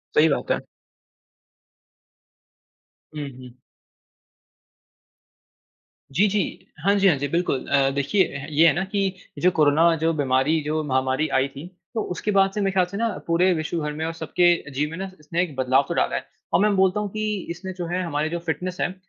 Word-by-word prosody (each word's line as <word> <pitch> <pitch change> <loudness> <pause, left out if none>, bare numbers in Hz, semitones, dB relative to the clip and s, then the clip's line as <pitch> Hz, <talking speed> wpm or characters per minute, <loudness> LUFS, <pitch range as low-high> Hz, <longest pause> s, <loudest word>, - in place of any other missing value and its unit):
सही 155 - +6
बात 140 - -1
है। - - +1 2.5
हुँ, 150 -2 -4
हुँ। 125 -1 -13 2.5
जी, 190 +10 +3
जी। 200 -3 -2 0.2
हाँ 200 - +5
जी, 200 -1 +4
हाँ 175 - +5
जी 145 +1 -2
बिल्कुल। 170 -3 -1
अ, 140 -1 +3
देखिए 145 +8 +2
अ, 140 - -6
ये 155 +2 +5
है 155 - +5
ना 175 - 0
कि 195 -1 -1 0.3
जो 180 - +4
कोरोना 160 +1 +4
जो 160 +1 +1
बीमारी 140 +1 +2
जो 155 +1 -1
महामारी 130 +1 0
आई 135 - +1
थी 140 +4 -10 0.3
तो 225 - -1
उसके 180 +4 -2
बाद 195 -1 +4
से 210 - -2
मेरे 195 -1 +1
ख्याल 185 -1 +3
से 190 +3 -7
ना 230 +2 +1 0.2
पूरे 175 +3 +3
विश्व 160 +1 -3
भर 150 -1 -3
में 155 +2 -3
और 165 - -3
सबके 165 -1 +1
जीवन 150 +3 -1
में 165 - -6
ना 190 0 -5
इसने 165 +3 -2
एक 160 -6 -6
बदलाव 130 +1 +2
तो - - -2
डाला - - +1
है। - - -3 0.3
और - - +5
मैं 210 -1 +3
बोलता 190 +1 +3
हूँ 210 -1 -2
कि 215 +2 -3 0.2
इसने 185 +3 -6
जो 175 - -3
है 180 +2 -1
हमारे 155 -2 -1
जो 170 +1 -3
फ़िटनेस 175 +2 -3
है 180 - 0
165 Hz, 195 wpm, -23 LUFS, 145-185 Hz, 2.5 s, सही